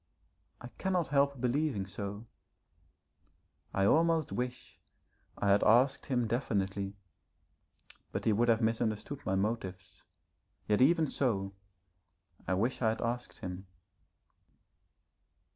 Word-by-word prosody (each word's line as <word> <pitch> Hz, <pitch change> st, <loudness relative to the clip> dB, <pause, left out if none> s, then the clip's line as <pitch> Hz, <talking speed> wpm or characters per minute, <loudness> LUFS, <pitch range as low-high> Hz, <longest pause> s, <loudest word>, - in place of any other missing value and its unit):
I 120 Hz, -, -8 dB
cannot 185 Hz, -5 st, 0 dB
help 140 Hz, -1 st, +2 dB
believing 125 Hz, -4 st, 0 dB
so. 100 Hz, +3 st, -6 dB, 1.5 s
I 95 Hz, -, +1 dB
almost 165 Hz, +4 st, +3 dB
wish 125 Hz, 0 st, -5 dB, 0.6 s
I 100 Hz, -, 0 dB
had 100 Hz, +1 st, +4 dB
asked 130 Hz, +5 st, +4 dB
him 125 Hz, -4 st, +1 dB
definitely, 100 Hz, -4 st, -1 dB, 1.2 s
but -, -, -4 dB
he 110 Hz, -, +4 dB
would 120 Hz, +3 st, +2 dB
have 115 Hz, 0 st, +3 dB
misunderstood 115 Hz, +4 st, -1 dB
my 95 Hz, -, +1 dB
motives. 95 Hz, -2 st, -3 dB, 0.7 s
Yet, 105 Hz, +1 st, +2 dB
even 160 Hz, +4 st, +5 dB
so, 100 Hz, -9 st, -1 dB, 0.9 s
I 95 Hz, -, +1 dB
wish 115 Hz, +8 st, 0 dB
I 110 Hz, -, +3 dB
had 110 Hz, -, -2 dB
asked 120 Hz, +1 st, -4 dB
him. 90 Hz, +1 st, -6 dB
115 Hz, 110 wpm, -32 LUFS, 100-135 Hz, 1.5 s, even